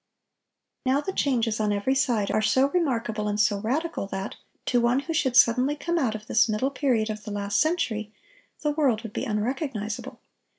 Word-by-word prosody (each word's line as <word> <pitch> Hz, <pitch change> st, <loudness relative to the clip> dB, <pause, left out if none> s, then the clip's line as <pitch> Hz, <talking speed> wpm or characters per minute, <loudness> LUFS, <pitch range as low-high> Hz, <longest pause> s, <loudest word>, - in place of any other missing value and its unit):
Now 265 Hz, +2 st, +2 dB
the 380 Hz, +6 st, -4 dB
changes, 235 Hz, -8 st, 0 dB
on 210 Hz, -1 st, +1 dB
every 205 Hz, +6 st, +1 dB
side, 240 Hz, -6 st, +1 dB
are 215 Hz, -, +2 dB
so 260 Hz, +5 st, +3 dB
remarkable 230 Hz, -11 st, 0 dB
and 205 Hz, 0 st, -1 dB
so 205 Hz, -1 st, +3 dB
radical 270 Hz, +2 st, -2 dB
that, 195 Hz, +1 st, -5 dB, 0.3 s
to 245 Hz, -1 st, +2 dB
one 240 Hz, +3 st, +2 dB
who 330 Hz, +3 st, -4 dB
should 265 Hz, -6 st, +1 dB
suddenly 255 Hz, +4 st, +5 dB
come 340 Hz, +3 st, -1 dB
out 235 Hz, -7 st, 0 dB
of 215 Hz, 0 st, -7 dB
this 220 Hz, +1 st, +3 dB
middle 215 Hz, +6 st, 0 dB
period 245 Hz, -6 st, +1 dB
of 210 Hz, 0 st, -7 dB
the 210 Hz, -, -7 dB
last 200 Hz, -1 st, 0 dB
century,... 240 Hz, -11 st, 0 dB, 0.5 s
the 300 Hz, -, +1 dB
world 270 Hz, -7 st, +1 dB
would 225 Hz, -2 st, -8 dB
be -, -, -2 dB
unrecognizable. 220 Hz, -1 st, -3 dB
235 Hz, 185 wpm, -26 LUFS, 215-275 Hz, 0.5 s, suddenly